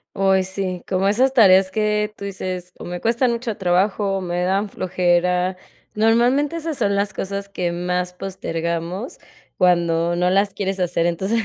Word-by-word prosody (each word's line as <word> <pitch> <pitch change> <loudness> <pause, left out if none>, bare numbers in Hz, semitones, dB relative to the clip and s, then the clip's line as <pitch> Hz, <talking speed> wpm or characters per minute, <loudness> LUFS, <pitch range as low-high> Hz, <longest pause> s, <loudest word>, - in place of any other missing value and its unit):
Ay, 190 -1 +3
sí, 185 -1 -4
como 190 0 0
esas 255 +6 +3
tareas 190 -6 +6
que 210 +1 0
tú 200 - -8
dices: 185 -2 -5
"O - - -7
me 175 0 -5
cuestan 235 +4 +1
mucho 235 -2 -3
trabajo, 195 +2 +1
o - - -2
me 175 -1 -2
dan 195 +3 0
flojera". 180 0 +1 0.4
Normalmente 245 +8 +2
esas 320 -3 -4
son 200 -3 +1
las 200 -1 -1
cosas 200 +1 -4
que 180 -3 -2
más 180 +1 -2
postergamos 175 - -4 0.4
cuando 170 -1 +2
no 180 +1 +2
las 200 +2 +2
quieres 195 0 -3
hacer, 175 -1 +1
entonces 195 +6 0
190 Hz, 165 wpm, -21 LUFS, 180-210 Hz, 0.4 s, tareas